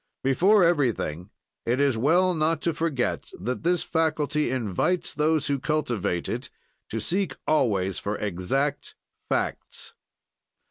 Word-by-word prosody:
"Before 185 +10 +4
everything, 120 - +1 0.3
it 120 +3 0
is 140 -3 +3
well 175 +10 +3
not 160 0 +1
to 170 - +1
forget 150 -6 -1
that 125 +7 -3
this 175 0 +1
faculty 155 -3 0
invites 130 - 0
those 155 0 +2
who 140 -1 0
cultivate 125 - -1
it - - -4 0.4
to 115 - -3
seek 175 - 0
always 100 - +1
for 105 +1 -3
exact 130 +10 -2 0.3
facts. - - -2
140 Hz, 125 wpm, -26 LUFS, 115-160 Hz, 0.4 s, Before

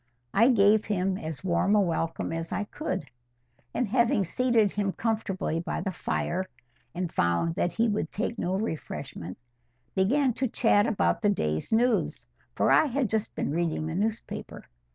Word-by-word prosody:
I 230 +5 +5
gave 210 -2 +5
him 190 -2 0
as 155 -1 -6
warm 190 +3 +2
a - - +5
welcome 165 -4 -1
as 165 0 -4
I - - -1
could, 210 - -4 0.7
and 250 - -1
having 235 -1 +3
seated 230 0 +2
him 200 -2 -1
comfortably 210 -7 -1
by 170 - -3
the 195 - -2
fire, 185 +1 -2 0.5
and 175 -1 -3
found 85 - +1
that 175 -1 -1
he 230 +6 +2
would 205 -6 -1
take 225 +2 -3
no 185 +2 0
refreshment, 145 - -5 0.6
began 250 +7 +2
to 260 +3 -1
chat 225 -2 +3
about 220 - +1
the 210 - +3
day's 80 - -1
news, 235 +1 +1 0.3
for - - +2
I - - +6
had 260 -3 -1
just 220 -1 -1
been - - -1
reading 160 -1 -1
the 160 - -3
newspaper. 215 +5 -3
200 Hz, 165 wpm, -28 LUFS, 170-225 Hz, 0.7 s, I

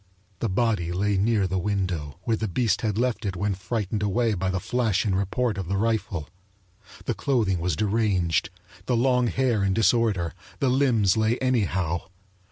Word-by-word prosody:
The 115 - -1
body 95 -4 0
lay 100 +3 0
near 105 +1 +2
the 95 0 -1
window, 90 -7 -2
where 115 - +1
the 110 0 -2
beast 105 +2 0
had 105 -3 -1
left 120 0 0
it 100 -3 -2
when 100 +2 0
frightened 105 +2 -3
away 110 +3 +1
by 95 -1 -1
the 95 0 -1
flash 110 -1 0
and 100 -3 +1
report 100 +3 -1
of 95 - -4
the 95 +2 -1
rifle. 105 -7 -1 0.8
The - - 0
clothing 110 -10 0
was 85 -1 0
deranged, 100 -5 +1 0.4
the 125 - +2
long 125 0 +3
hair 120 -4 +1
in 95 -1 +1
disorder, 110 -6 +2 0.2
the 135 - +1
limbs 120 -7 +3
lay 110 +2 +2
anyhow. 95 - 0
105 Hz, 175 wpm, -25 LUFS, 95-115 Hz, 0.8 s, long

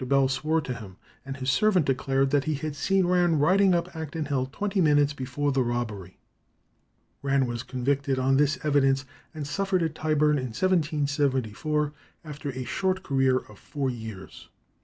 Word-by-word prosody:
Bell 135 0 +3
swore 155 +4 0
to 130 - -4
him, 100 -6 -10 0.3
and 135 0 -6
his 130 +1 0
servant 185 +2 +3
declared 135 0 +1
that 145 -1 +2
he 155 -1 0
had 150 +1 -4
seen 190 +5 +1
Rann 175 -2 +3
riding 185 +5 +4
up 170 0 -2
Acton 160 0 -4
Hill 135 -3 -1
twenty 200 +3 -1
minutes 145 -2 +3
before 140 +1 -2
the 135 -1 +1
robbery. 110 -7 -3 1.0
Rann 140 -1 +2
was 120 -1 -3
convicted 135 +2 -1
on 135 +1 +2
this 145 +1 +2
evidence 135 -2 +2 0.3
and 150 -2 -4
suffered 190 +3 0
at 160 -2 -1
Tyburn, 150 -2 +2
in 130 - -3
1774, 150 - 0 0.3
after 150 -1 -6
a 130 -1 -4
short 185 +9 -1
career 135 -2 +2
of 105 -2 -15
four 140 -3 -3
years. 110 -5 -9
140 Hz, 165 wpm, -26 LUFS, 130-155 Hz, 1.0 s, riding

